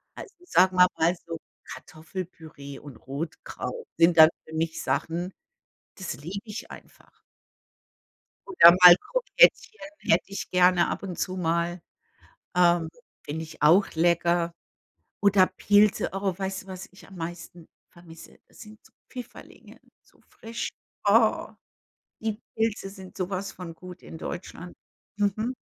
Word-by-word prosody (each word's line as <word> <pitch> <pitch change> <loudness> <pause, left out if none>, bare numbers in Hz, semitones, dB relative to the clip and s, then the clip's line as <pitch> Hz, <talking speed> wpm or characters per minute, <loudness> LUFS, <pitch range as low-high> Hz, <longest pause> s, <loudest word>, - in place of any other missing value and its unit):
Also - - -11
sagen 185 - +3
wir 180 0 +8
mal 170 +2 +2
so: 165 -1 -6 0.3
„Kartoffelpüree 160 -4 -9
und 140 -5 -12
Rotkraut 160 - -7
sind 170 0 +4
dann 160 0 +10 0.2
für 160 - -12
mich 160 0 -2
Sachen, 175 +3 -2 0.6
das 190 -3 -6
liebe 180 +7 -7
ich 210 0 -8
einfach.“ - - -16 1.3
Oder 170 - +8
mal 180 -1 +12
Krokettchen 485 - +2 0.2
hätte - - +2
ich 195 - -6
gerne 180 -1 +4
ab - - -4
und 185 -3 -6
zu 185 0 -2
mal. 170 0 -1 0.8
Ähm, 175 -2 +3 0.4
finde 160 +2 -5
ich 160 - -11
auch 175 +7 +5
lecker. 170 +1 +1 0.7
Oder 200 -2 +5
Pilze, 205 +2 +2
oh, 195 -1 -2
weißt 190 0 -4
du, - - -22
was 185 0 -8
ich 190 - -16
am 195 - -13
meisten 170 0 -8 0.2
vermisse? 165 -1 -15
Das - - -20
sind 215 0 -13
so - - -22 0.2
Pfifferlinge, 250 -2 -12 0.2
so - - -28
frisch. 230 +1 -6 0.4
Oh. - - +3 0.7
Die 220 0 -3
Pilze 220 -3 -1
sind 190 -2 -13
so 185 -2 -3
was 195 0 -3
von 175 -2 -9
gut 180 +1 -12
in - - -10
Deutschland. 175 +1 -8 0.4
Mhm. 210 +4 -1
180 Hz, 140 wpm, -26 LUFS, 165-195 Hz, 1.3 s, mal